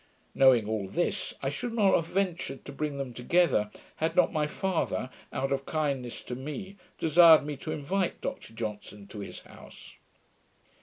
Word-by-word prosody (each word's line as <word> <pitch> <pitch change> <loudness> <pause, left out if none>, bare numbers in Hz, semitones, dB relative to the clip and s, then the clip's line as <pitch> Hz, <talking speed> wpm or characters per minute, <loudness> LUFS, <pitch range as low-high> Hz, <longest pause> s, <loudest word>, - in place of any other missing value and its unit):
Knowing 130 -5 +5
all 110 -3 -2
this, 175 - -1
I 135 - 0
should 230 +11 -4
not 205 -4 +4
have 165 - +2
ventured 175 -8 -2
to - - -7
bring 145 0 -3
them 135 -3 -4
together, 125 -3 +2 0.3
had 160 +1 -1
not 180 - +4
my 150 -2 +1
father, 170 -7 -2 0.2
out 135 +1 -2
of 135 0 -1
kindness 140 -6 -2
to - - -6
me, 150 +10 -6 0.2
desired 160 -1 +7
me 150 0 -3
to 155 - -5
invite 170 +5 -1
Dr - - -6
Johnson 105 -2 -6
his 105 -2 -7
house. - - -14
145 Hz, 160 wpm, -29 LUFS, 125-170 Hz, 0.3 s, desired